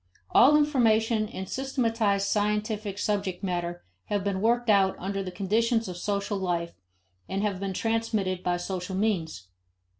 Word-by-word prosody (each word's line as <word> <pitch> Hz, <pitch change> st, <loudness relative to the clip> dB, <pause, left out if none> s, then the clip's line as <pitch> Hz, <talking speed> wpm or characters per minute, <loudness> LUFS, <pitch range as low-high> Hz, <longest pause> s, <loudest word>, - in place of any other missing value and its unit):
All 285 Hz, +5 st, +7 dB
information 225 Hz, -7 st, +2 dB
and 190 Hz, -4 st, -6 dB
systematized 230 Hz, -7 st, 0 dB
scientific 210 Hz, 0 st, -1 dB
subject 200 Hz, -3 st, -2 dB
matter 175 Hz, -2 st, -3 dB, 0.2 s
have 205 Hz, -2 st, -1 dB
been 195 Hz, -1 st, -1 dB
worked 240 Hz, +2 st, +2 dB
out 195 Hz, -3 st, +4 dB
under 195 Hz, +2 st, -3 dB
the 190 Hz, -, -4 dB
conditions 225 Hz, +4 st, +1 dB
of 180 Hz, -, -5 dB
social 200 Hz, +2 st, -2 dB
life 170 Hz, -2 st, -2 dB, 0.6 s
and 195 Hz, +1 st, -1 dB
have 200 Hz, -3 st, -1 dB
been 195 Hz, -1 st, -3 dB
transmitted 220 Hz, -4 st, -1 dB
by 180 Hz, -1 st, 0 dB
social 185 Hz, +1 st, -4 dB
means. 170 Hz, -, -1 dB
200 Hz, 145 wpm, -27 LUFS, 185-225 Hz, 0.6 s, All